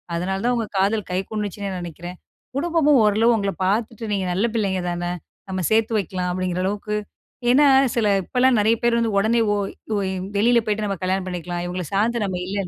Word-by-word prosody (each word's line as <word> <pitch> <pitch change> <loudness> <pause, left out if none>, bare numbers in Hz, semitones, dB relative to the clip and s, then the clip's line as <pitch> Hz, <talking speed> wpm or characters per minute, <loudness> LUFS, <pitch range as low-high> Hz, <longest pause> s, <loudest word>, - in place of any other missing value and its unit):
அதனால 190 +3 -2
தான் 245 - +2
உங்க 225 -2 -2
காதல் 200 +2 +1
கை 180 - 0
கூடுச்சுன்னு 205 -2 -3
நெனைக்கறேன். 175 +1 -8 0.4
குடும்பமும் 300 -2 +3
ஓரளவு 215 +3 +4
உங்கள 200 -1 -1
பார்த்துட்டு 225 +3 -1
நீங்க 195 -2 0
நல்ல 195 +6 +1
பிள்ளைங்க 195 -5 0
தானே, 175 0 -3 0.4
நம்ம 185 0 -2
சேர்த்து 225 +1 +2
வைக்கலாம் 180 -1 -3
அப்படிங்கிறளவுக்கு 185 +3 -2 0.5
ஏன்னா 280 +4 +6 0.3
சில 220 -3 +2 0.2
இப்போலாம் 250 +3 +2
நெறைய 220 +2 +3
பேர் 235 0 +3
வந்து 225 -3 0
உடனே 225 +3 +3
ஓய் 200 -1 -3 0.2
வெளில 235 +3 +4
போய்ட்டு 210 0 -1
நம்ம 195 -1 -2
கல்யாணம் 185 0 -1
பண்ணிக்கலாம் 175 -1 -4
இவங்கள 180 +1 -3
சார்ந்து 220 +2 +1
நம்ம 185 -2 -3
இல்ல 195 -1 -2
205 Hz, 170 wpm, -22 LUFS, 185-225 Hz, 0.5 s, ஏன்னா